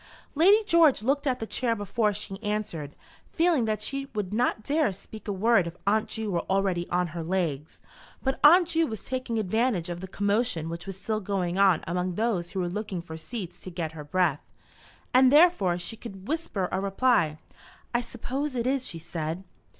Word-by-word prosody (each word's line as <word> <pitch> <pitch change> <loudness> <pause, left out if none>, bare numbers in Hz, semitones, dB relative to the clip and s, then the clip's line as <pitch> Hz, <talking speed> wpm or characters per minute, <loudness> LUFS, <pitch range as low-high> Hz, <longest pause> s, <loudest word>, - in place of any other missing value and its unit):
Lady 390 +8 +5
George 335 - +4
looked 280 +4 +1
at 255 -2 +1
the 225 - -3
chair 230 +1 0
before 210 +1 0
she 195 -1 -6
answered, 200 -9 -3 0.4
feeling 330 -7 +2
that 215 -1 -1
she 275 +3 -3
would 205 -2 -2
not 220 -1 +1
dare 300 +5 +2
to 200 - -2
speak 215 +4 -11
a - - 0
word 200 -2 +3
if 170 - -8
Aunt 215 +2 +2
Ju 220 -2 -3
were 170 -2 0
already 190 -3 0
on 180 0 0
her 170 - -4
legs; 160 -4 -2 0.4
but 265 0 0
Aunt 340 +3 +7
Ju 330 -1 +2
was 220 -3 -6
taking 255 -3 -3
advantage 215 -3 0
of 175 0 -4
the 190 - -7
commotion 200 -4 0
which 170 +3 -6
was 195 -1 -6
still 215 +1 -2
going 190 -3 -2
on 195 -4 +4
among 180 +1 -2
those 210 -6 0
who 190 - -4
were 180 - 0
looking 190 -1 -4
for 160 -2 -8
seats 185 +2 -7
to - - -8
get 170 -3 -4
her 155 -2 -8
breath, 160 -1 +1 0.7
and 255 0 +6
therefore 290 - +5
she 175 +5 -4
could 195 -4 -10
whisper 290 - -2
a 190 - -1
reply. 200 -5 +2 0.6
"I 240 - +2
suppose 260 +4 -4
it 235 -1 -1
is," 260 0 0
she 165 - -6
said. 165 +1 -4
205 Hz, 195 wpm, -27 LUFS, 180-250 Hz, 0.7 s, Aunt